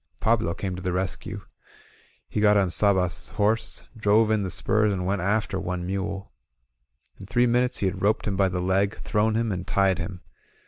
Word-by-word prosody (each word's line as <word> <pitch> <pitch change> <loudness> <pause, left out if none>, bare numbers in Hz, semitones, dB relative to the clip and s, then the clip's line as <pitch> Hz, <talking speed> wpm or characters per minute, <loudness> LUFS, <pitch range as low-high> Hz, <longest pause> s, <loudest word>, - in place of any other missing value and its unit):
Pablo 110 -7 +1
came 95 -2 -4
to 90 - -7
the 90 -1 -2
rescue. 95 +1 -3 0.9
He 105 - -2
got 105 -1 +5
on 95 -3 +2
Sabas's 95 -1 +2
horse, 110 +2 0
drove 110 0 +3
in 110 -1 +2
the 95 - -2
spurs, 105 +4 +2
and 90 -2 -2
went 95 0 -1
after 100 0 0
one 90 -1 -4
mule. 100 +1 -4 0.9
In 95 - -10
three 125 +2 +2
minutes 125 +1 +2
he - - -1
had 95 0 -2
roped 105 +2 +1
him 100 - -1
by 95 0 +2
the 90 0 -2
leg, 95 +3 0
thrown 110 0 +1
him, 115 -1 0
and 90 0 -4
tied 95 -4 +2
him. 90 +1 -6
100 Hz, 190 wpm, -25 LUFS, 95-110 Hz, 0.9 s, got